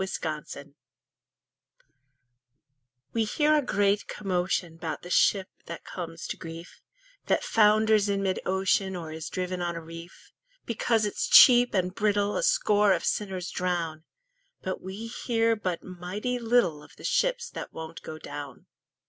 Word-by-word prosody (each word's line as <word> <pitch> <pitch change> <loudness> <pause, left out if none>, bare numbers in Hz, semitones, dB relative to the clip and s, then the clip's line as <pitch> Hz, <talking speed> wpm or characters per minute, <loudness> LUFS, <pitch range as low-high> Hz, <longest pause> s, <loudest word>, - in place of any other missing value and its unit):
0 - - -3
Autoplay 150 -4 -5 2.4
We 230 - +2
hear 300 +8 +2
a 300 - +4
great 205 -5 +1
commotion 180 -3 -2
'Bout 165 -1 -5
the 180 - -8
ship 190 0 +3 0.2
that 170 - -7
comes 165 -2 -7
to - - -4
grief, 165 +1 -10 0.5
That - - +2
founders 215 -1 +4
in 200 0 0
mid 190 -1 0
ocean, 190 0 +1
Or 165 -3 -6
is 160 +1 -6
driven 185 0 -3
on 175 -1 -2
a - - -4
reef; 165 +1 -12 0.3
Because 225 -1 +1
it's 205 - -2
cheap 245 -3 +8
and 185 -1 0
brittle 205 0 +1
A - - 0
score 210 - +3
of 170 - -2
sinners 190 -3 -2
drown. 170 -3 -2 0.6
But 185 - -3
we 190 +4 -7
hear 230 -1 0
but 185 -5 -3
mighty 185 +7 -4
little 225 -10 +2
Of - - -16
the - - -15
ships - - +1
that - - -7
won't 160 0 -8
go 155 - -8
down. 145 -4 -8
190 Hz, 150 wpm, -27 LUFS, 170-215 Hz, 2.4 s, cheap